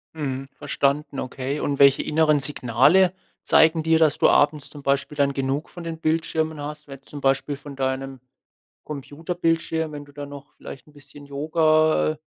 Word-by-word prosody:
Mhm. 135 -3 -4
Verstanden, 140 0 -1
okay, 135 +3 -4
und 140 -1 -2
welche 140 -1 +6
inneren 155 -1 +2
Signale 145 +7 +3 0.3
zeigen 160 0 +4
dir, 160 0 +3
dass 155 -3 +3
du - - +4
abends 145 0 +2
zum 145 -2 -12
Beispiel 140 +2 0
dann 140 -1 +2
genug 135 +3 -2
von 175 - -10
den 165 -1 -6
Bildschirmen 160 -1 -1
hast, 150 +1 -7
wenn 135 -1 -11
zum 145 +1 -10
Beispiel 135 +1 +1
von 140 0 -11
deinem 135 0 -3 0.7
Computerbildschirm 160 +2 -2
wenn 145 -1 -7
du 145 - -18
dann 145 0 -8
noch 145 0 -12
vielleicht 130 - -11
'n 150 - -19
bisschen 145 0 -15
Yoga 155 +2 +2
äh, 155 - -11
145 Hz, 170 wpm, -23 LUFS, 140-155 Hz, 0.7 s, welche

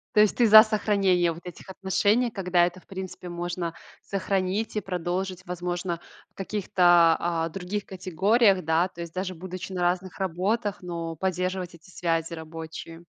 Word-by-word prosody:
То 210 - +7
есть 210 - +3
ты 240 -2 +5
за 215 +1 +11
сохранение 195 -5 +2
вот 170 +2 -10
этих 180 +2 -10
отношений, 200 +5 +1
когда 180 -3 +2
это 180 +1 -4
в - - -27
принципе 185 -2 -7
можно 175 -1 -4 0.3
сохранить 195 +2 -2
и 210 - 0
продолжить, 185 +1 -3
возможно, 175 -1 -3 0.3
в - - -40
каких-то, 175 -4 +4
а, 165 -1 -1
других 195 +4 -4
категориях, 190 +2 +2
да. 160 +3 +2
То 170 -2 -11
есть 170 -1 -7
даже 185 0 -3
будучи 185 +2 -7
на 180 - -3
разных 180 +2 -1
работах, 195 +4 -1
но 170 -2 -5
поддерживать 185 0 -2
эти 170 +3 -18
связи 165 -1 -1
рабочие. 165 +1 -8
180 Hz, 160 wpm, -26 LUFS, 170-195 Hz, 0.3 s, за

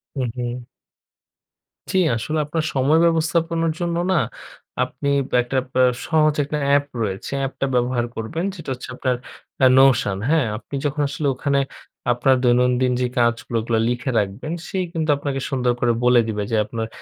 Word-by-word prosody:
হুম, 130 -3 -1
হুম। 120 0 -4 1.3
জ্বি, - - +1 0.2
আসলে 155 +8 -2
আপনার 155 +2 -2
সময় 140 +4 +3
ব্যবস্থাপনার 165 0 +1
জন্য 170 -1 -1
না - - +3 0.7
আপনি - - -5 0.3
একটা 125 +2 -3 0.2
আ - - +6 0.2
সহজ 155 -2 +3
একটানা 145 0 -2
অ্যাপ 145 0 +4 0.2
রয়েছে। 100 -3 -3
অ্যাপটা 135 0 -2
ব্যবহার 125 -1 +1
করবেন। 115 +10 -3
যেটা 165 -6 -8
হচ্ছে 125 - -9
আপনার 130 -1 0 0.5
আ - - +8
Notion 125 -7 +4
হ্যাঁ? 160 -3 +3
আপনি 115 +5 -8
যখন 145 +1 0
আসলে 145 +1 -2
ওখানে 140 +2 +1 0.5
আপনার 130 +2 +3
দৈনন্দিন 125 +1 +3
যে - - +2
কাজগুলো 120 -1 +1
ওগুলো 115 0 0
লিখে 125 +2 -2
রাখবেন 105 +10 -3
সে - - -4 0.2
কিন্তু 160 -2 -2
আপনাকে 140 -1 -3
সুন্দর 125 -3 +1
করে 120 -1 +2
বলে 125 0 +5
দিবে 105 -2 -2
যে - - +2
আপনার 115 +1 -4
130 Hz, 160 wpm, -21 LUFS, 120-155 Hz, 1.3 s, আ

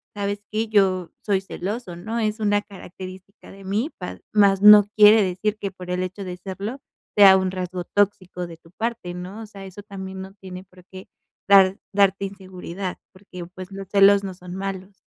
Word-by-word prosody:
¿sabes 205 0 -3
qué?, 220 +1 -1
yo 185 -5 +2
soy 195 -3 +1
celoso, 195 +1 -6
¿no? 220 +7 -5
Es 215 0 -1
una 205 -1 +2
característica 190 0 -12
de 195 0 -13
mí", 215 - -1
pa 180 - -7
más 200 -2 +4
no 210 0 +9
quiere 215 +1 +8
decir 195 +3 -2
que 200 -2 -4
por 180 -1 -9
el 180 0 -1
hecho 185 +2 -6
de 180 -1 -6
serlo, 200 +8 -6 0.3
sea 195 -2 +8
un 190 -1 -1
rasgo 185 -1 -4
tóxico 185 -3 -1
de 165 -1 -11
tu 165 0 -22
parte, 220 -3 -4
¿no? 180 +5 -8
O - - -7
sea, 200 -2 -11
eso 190 +2 -11
también 190 -2 -8
no 190 0 -9
tiene 185 -2 -10
por 185 -1 -20
qué 185 0 -12 0.4
dar 195 -1 +6 0.2
darte 195 -1 +3
inseguridad, 190 -1 -7 0.2
porque, 185 -2 -10
pues, 185 +2 -11
los 195 0 -8
celos 200 0 +5
no 190 -1 -5
son 180 0 -10
malos. 195 0 -6
195 Hz, 190 wpm, -23 LUFS, 185-205 Hz, 0.4 s, no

